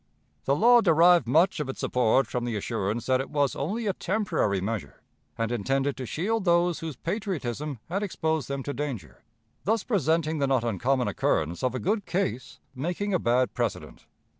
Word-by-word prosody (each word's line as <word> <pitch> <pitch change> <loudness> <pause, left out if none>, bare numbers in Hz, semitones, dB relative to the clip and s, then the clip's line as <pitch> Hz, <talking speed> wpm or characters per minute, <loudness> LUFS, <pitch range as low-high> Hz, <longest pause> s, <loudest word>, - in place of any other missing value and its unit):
The 140 - +2
law 240 +7 +6
derived 170 - +5
much 160 +9 +3
of 150 -3 -3
its 135 - -6
support 125 +2 +2
from 125 -2 -3
the 120 -2 -2
assurance 105 +2 -2
that 130 0 +2
it - - -7
was 145 -3 +1
only 210 +11 -2
a 200 - +1
temporary 185 - 0
measure, 95 - -5 0.3
and 115 0 -1
intended 135 +5 0
to 130 - -5
shield 210 - -1
those 175 -1 +2
whose 160 -3 -5
patriotism 150 - -3
had 190 +4 -2
exposed 160 - -1
them 140 -1 -3
to 145 - -4
danger, 135 - -5 0.4
thus 220 +2 +1
presenting 160 - +1
the 140 - +1
not 130 -3 +2
uncommon 125 +3 0
occurrence 85 -3 0
of 130 0 0
a - - -2
good 205 +2 -1
case 180 -9 -2
making 175 +9 -2
a 180 - +2
bad 125 0 +1
precedent. 120 -5 -4
145 Hz, 180 wpm, -27 LUFS, 125-175 Hz, 0.4 s, law